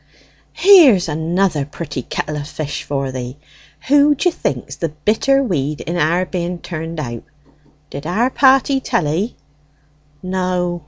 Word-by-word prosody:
"Here's 315 - +6
another 160 +1 0
pretty 145 -1 -6
kettle 150 +4 -4
o' - - -3
fish 145 0 -5
for 135 -2 -3
thee. 125 +1 -6 0.5
Who 290 +1 +5
d'ye 355 +6 +1
think's 135 - -4
the 165 - -2
bitter 220 - +1
weed 150 - -2
in 170 - -4
our 175 +2 +1
being 180 -1 -3
turned 165 -1 -6
out? 120 -5 -5 0.7
Did 140 +2 -6
our 225 +9 +1
party 270 0 +4
tell 180 - -1
'ee?" 180 +10 -2 0.9
"No. 180 -1 -1
175 Hz, 140 wpm, -18 LUFS, 150-215 Hz, 0.9 s, Here's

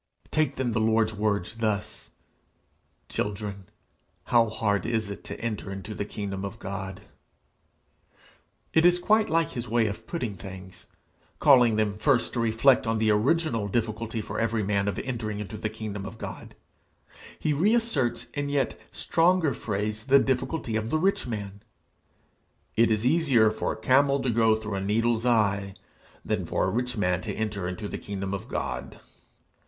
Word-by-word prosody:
Take 150 -3 +1
then 130 -3 -1
the 110 - 0
Lord's 110 0 +2
words 105 0 -1
thus: 105 -2 -2 1.0
'Children, 100 -1 -4 0.6
how 115 -2 +3
hard 105 -2 0
is 110 -3 -1
it 100 - -8
to - - -6
enter 110 -3 -4
into 95 +2 -6
the 100 - -3
kingdom 100 -2 -5
of 100 +3 -5
God!' 95 -2 -6 1.7
It 160 - +5
is 175 0 +6
quite 215 +4 +3
like 165 -1 +2
his 120 -2 -5
way 115 0 +3
of 110 +1 -4
putting 125 -11 -3
things. 95 -1 -10 0.5
Calling 125 -6 +6
them 105 -1 0
first 125 +1 +2
to 120 - -1
reflect 115 +3 +3
on 115 0 +1
the 110 0 +3
original 115 0 +1
difficulty 115 +1 -2
for - - -5
every 115 -1 0
man 100 0 0
of 100 - -1
entering 110 -5 -3
into 105 +1 -6
the 110 - -3
kingdom 105 -2 -6
of 115 - -9
God, - - -8 0.8
he 155 - 0
reasserts 195 - +1
in 145 -1 -2
yet 140 -3 -1
stronger 165 -3 +2
phrase 105 0 -3
the 140 0 +7
difficulty 130 -2 0
of 110 0 -1
the 155 - +2
rich 190 -3 +1
man: 100 -3 -5 1.1
'It 115 +1 +4
is 110 +1 +1
easier 130 -7 +4
for - - -2
a - - -9
camel 140 +4 +4
to 125 - 0
go 110 -1 +4
through 110 -1 -5
a 95 - -2
needle's 115 +4 +1
eye, 100 -4 +2 0.5
than - - -1
for - - 0
a - - 0
rich 125 +1 -2
man 90 -2 +1
to - - -4
enter 105 -4 -2
into 90 +3 -4
the - - -5
kingdom 100 -1 -4
of 100 - -5
God.' - - -4
110 Hz, 165 wpm, -27 LUFS, 105-125 Hz, 1.7 s, the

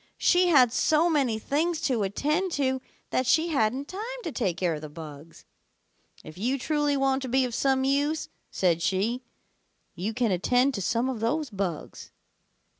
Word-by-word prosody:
She 360 0 +4
had 255 -8 +5
so 315 +6 +3
many 265 -8 +1
things 310 +8 -1
to 250 -5 0
attend 300 - 0
to 265 -2 0 0.3
that 255 - 0
she 325 +5 +3
hadn't 270 -1 0
time 385 +3 -6 0.2
to 330 - -4
take 195 -11 -1
care 175 -3 0
of 150 - -6
the 155 - -7
bugs. 150 0 -11 0.8
'If 155 +3 -11
you 250 +6 0
truly 295 +1 0
want 270 0 +1
to 260 - -5
be 260 +1 +2
of 245 - -5
some 265 +1 +1
use,' 285 +3 0 0.2
said 170 -3 +1
she, 195 +8 0 0.7
'you 210 +5 -4
can 240 -4 +1
attend 245 +9 +2
to 200 - -3
some 230 +6 0
of 260 -4 -3
those 280 +5 -1
bugs.' 190 -6 -5
255 Hz, 175 wpm, -27 LUFS, 200-290 Hz, 0.8 s, had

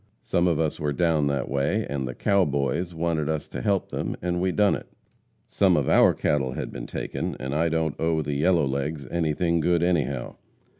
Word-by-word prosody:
Some 85 +1 +1
of 85 -3 +1
us 80 -2 -1
were 75 -1 -1
down 80 -2 +2
that 70 -1 -1
way, 70 +11 0
and 70 -2 -3
"the 60 - -6
cow 100 -2 +2
boys" 70 +4 -1
wanted 80 -2 -1
us 80 -1 -2
to 60 - -5
help 100 +7 0
them - - -3
and 90 0 -1
we 95 0 +1
done 105 +1 +3
it. - - -5 0.6
Some 95 -4 +2
of 70 - 0
our - - +5
cattle 65 -3 0
had - - -5
been - - -7
taken, - - -4
and 65 +1 -4
I 80 +3 +1
don't 80 -2 -1
owe 80 -1 +1
the 70 0 -3
yellow 80 +2 +3
legs 70 +2 -3
anything 85 0 +1
good 85 +1 +2
anyhow. 70 -8 -1
80 Hz, 205 wpm, -25 LUFS, 70-85 Hz, 0.6 s, our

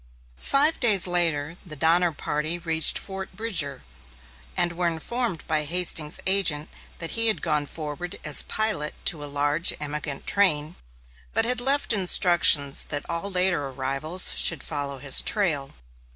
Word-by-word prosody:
Five 295 +4 +1
days 210 -7 +5
later 170 -3 -1
the 160 -5 -10
Donner 170 +4 +2
Party 150 +2 -4
reached 165 -2 +3
Fort 190 -1 -6
Bridger, 165 - -2 0.7
and 175 0 0
were 175 0 -2
informed 180 +3 -3
by 155 -1 -1
Hastings's 165 -1 +1
agent 170 -6 +1 0.3
that 165 - -5
he 230 0 0
had 220 - 0
gone 150 -1 0
forward 160 +5 -7
as 150 -2 +2
pilot 215 -9 -2
to 150 -3 0
a 145 - -8
large 145 +4 +1
emigrant 150 -1 -6
train, 160 -6 0 0.6
but 225 +1 +2
had 245 0 +1
left 275 -1 0
instructions 175 -7 +4
that 145 -1 -5
all 170 +3 -3
later 180 -6 0
arrivals 135 +6 0
should 165 -5 +1
follow 145 -2 -5
his 135 0 +4
trail. 155 -10 -1
165 Hz, 145 wpm, -24 LUFS, 150-190 Hz, 0.7 s, days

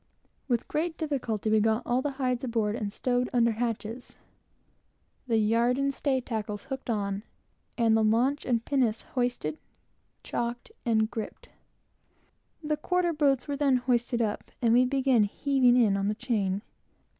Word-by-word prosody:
With 240 -3 0
great 320 +2 -2
difficulty, 245 - -2
we 220 - +5
got 220 +1 +1
all 245 +1 +1
the 285 0 -2
hides 255 -2 -1
aboard 225 -4 0
and 210 -3 -3
stowed 250 +2 0
under 235 -1 +3
hatches, 230 +1 -4 1.1
the 230 -2 +2
yard 230 +3 +2
and 275 0 0
stay 270 -1 0
tackles 215 -4 -4
hooked 265 -2 -6
on, 200 -3 -1 0.6
and 230 -2 +4
the 220 - +3
launch 245 +7 +2
and 235 -2 0
pinnace 250 -6 +1
hoisted, 245 - -1 0.6
checked, 240 - -4 0.2
and 220 -1 +2
griped. 220 -2 -6 1.1
The 300 0 0
quarter 355 +2 0
boats 280 -4 +2
were 285 - -2
then 280 -2 +3
hoisted 240 -1 0
up, 210 -1 -3
and 230 -2 +3
we 250 +2 +5
began 260 -4 +3
heaving 255 +2 +3
in 220 -5 +4
on 195 0 0
the 210 - 0
chain. 205 -5 -1
240 Hz, 155 wpm, -28 LUFS, 220-265 Hz, 1.1 s, we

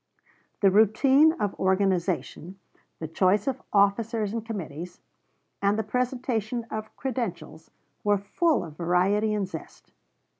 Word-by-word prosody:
The 195 -2 +5
routine 265 +9 +5
of 210 - -2
organization, 190 -1 0 0.4
the 160 - -5
choice 185 +5 +2
of 265 -1 -2
officers 210 +1 +1
and 230 -1 -3
committees, 180 -5 -7 0.6
and 200 +1 +2
the 220 - 0
presentation 245 0 -2
of 215 0 -6
credentials 200 - -5 0.3
were 205 -1 +3
full 295 - 0
of 155 -3 -11
variety 185 +5 +2
and 200 -2 -1
zest. 160 -4 -10
205 Hz, 120 wpm, -26 LUFS, 185-230 Hz, 0.6 s, The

